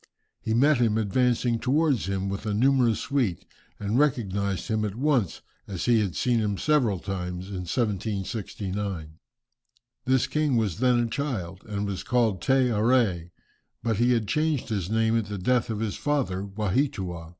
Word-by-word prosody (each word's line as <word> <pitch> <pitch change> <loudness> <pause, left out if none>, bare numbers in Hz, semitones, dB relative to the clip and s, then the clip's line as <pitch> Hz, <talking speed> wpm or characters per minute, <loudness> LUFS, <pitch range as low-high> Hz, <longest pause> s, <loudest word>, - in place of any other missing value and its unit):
He 110 - -1
met 140 +4 +4
him 110 -3 +2
advancing 120 +2 +1
towards 135 - +1
him 95 0 -1
with 100 +3 -4
a 105 - 0
numerous 125 -1 +3
suite, 125 -11 -1 0.3
and 105 +4 0
recognized 100 -9 0
him 110 -2 0
at 105 -2 -3
once 130 - 0 0.2
as 95 -4 -4
he 120 -2 +4
had 100 -5 -1
seen 120 -2 +1
him 105 -2 -1
several 130 -9 +2
times 90 0 -5
in 90 -2 -5
1769. 100 -5 -3 0.9
This 130 0 +3
king 145 -1 +1
was 105 -5 -1
then 125 -1 +3
a 120 - +2
child, 110 -9 -3
and 105 -1 -2
was 100 -2 -3
called 115 -7 +1
Te 130 0 +3
Arée, 110 -6 +2 0.5
but 115 -3 0
he 120 +2 +3
had 115 -3 0
changed 150 -3 0
his 100 -5 -2
name 110 +1 +2
at 115 -3 0
the 105 0 -4
death 120 +6 +1
of 110 -1 -3
his 110 -2 -2
father 120 -11 -1
Waheatua. 95 - -2
110 Hz, 165 wpm, -26 LUFS, 100-125 Hz, 0.9 s, met